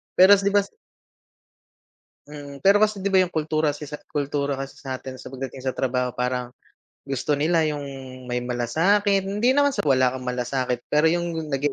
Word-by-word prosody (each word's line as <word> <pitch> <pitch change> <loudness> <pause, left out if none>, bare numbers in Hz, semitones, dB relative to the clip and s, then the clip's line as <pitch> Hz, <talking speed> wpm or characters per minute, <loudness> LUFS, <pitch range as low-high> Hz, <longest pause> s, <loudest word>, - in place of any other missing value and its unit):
Pero 185 +2 +7
kas 195 - -4
'di 200 - +1
ba. 205 - +6 1.7
Mm. 145 -1 -10
Pero 200 +1 +6
kasi 215 -1 +2
'di 200 - +1
ba 190 - +5
yung 185 -1 +1
kultura 155 -1 0
sa 150 - -9
isa 150 0 -7
kultura 145 -1 -2
kasi 135 0 -7
sa'tin 130 -1 -7
sa - - -10
pagdating 135 0 -7
sa 130 -1 -2
trabaho 125 -1 -1
parang 125 0 -2 0.6
gusto 135 +2 -1
nila 160 +3 +2
yung 150 -1 -2 0.5
may 125 - 0
malasakit, 185 - +1
hindi 210 +5 +1
naman 285 0 +4
sa - - -1
wala 130 -3 +3
kang 125 -1 -5
malasakit, 125 0 -2
pero 150 +2 +4
yung 165 -2 -2
naging 140 +1 0
145 Hz, 180 wpm, -24 LUFS, 130-175 Hz, 1.7 s, Pero